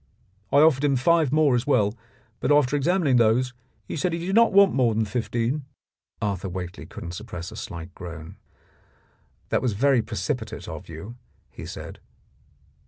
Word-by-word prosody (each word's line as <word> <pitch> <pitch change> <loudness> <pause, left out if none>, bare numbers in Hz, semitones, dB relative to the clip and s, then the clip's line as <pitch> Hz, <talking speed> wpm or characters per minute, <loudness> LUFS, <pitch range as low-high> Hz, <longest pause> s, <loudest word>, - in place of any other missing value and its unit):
I 140 - +6
offered 150 -3 +4
him 140 -2 +3
five 155 +2 +3
more 150 -2 +4
as 120 +2 0
well, 110 -7 +3 0.5
but - - 0
after 145 -2 +4
examining 145 -2 +2
those 120 +2 +3 0.3
he - - -5
said 165 +3 -1
he 170 0 -3
did 190 - -2
not 230 +2 +5
want 200 0 +6
more 120 -4 +2
than 110 0 +1
fifteen." 120 +5 -2 0.6
Arthur 100 -2 -2
Whately 90 -1 -6
couldn't 85 - -8
suppress 90 -3 -7
a - - -10
slight 85 +1 -7
groan. 85 -4 -9 1.1
"That - - +1
was 125 -4 0
very 130 +3 +3
precipitate 110 +3 -4
of - - -8
you," 90 +10 -9 0.3
he - - -9
said. - - -8
125 Hz, 165 wpm, -25 LUFS, 105-145 Hz, 1.1 s, I